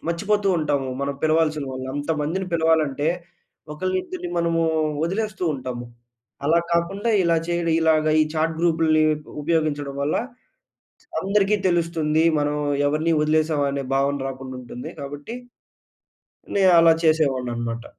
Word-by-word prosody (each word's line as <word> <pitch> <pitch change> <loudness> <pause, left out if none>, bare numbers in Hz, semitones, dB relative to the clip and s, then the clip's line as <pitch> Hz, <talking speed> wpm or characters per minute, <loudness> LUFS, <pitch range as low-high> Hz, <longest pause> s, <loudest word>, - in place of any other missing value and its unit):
మర్చిపోతూ 200 +4 0
ఉంటాము. 145 -3 -1
మనం 140 0 -2
పిలవాల్సిన 155 -1 +2
వాళ్ళు 130 0 -5
అంతమందిని 155 +5 -2
పిలవాలంటే 160 -3 +2 0.6
ఒకళ్ళు 185 +4 -2
ఇద్దరిని 365 - -6
మనము 165 -1 +1 0.4
వదిలేస్తూ 195 +1 -2
ఉంటాము. 125 -2 -5 0.6
అలా 165 +3 +4
కాకుండా 195 +7 0
ఇలా 170 -1 +2
చేయడం, 170 -1 0
ఇలాగ 160 -1 +3 0.2
ఈ - - +6
చాట్ 160 +1 0
గ్రూప్‌లని 160 -2 +3
ఉ 150 0 -12
ఉపయోగించడం 145 -3 -1
వల్ల 145 +2 0 1.1
అందరికీ 200 +1 +2
తెలుస్తుంది, 165 -2 +1
మనం 145 0 0 0.3
ఎవరిని 155 +3 +1
వదిలేసాం 155 -1 +1
అనే 140 -1 -3
భావన 140 0 +1
రాకుండా 130 -1 -7
ఉంటుంది 125 0 -8
కాబట్టి. 145 - -7 1.2
నేను 190 -2 +5
అలా 165 0 +7
చేసేవాడిని 140 -6 +2
అన్నమాట. 115 0 -4
155 Hz, 125 wpm, -23 LUFS, 145-170 Hz, 1.2 s, అలా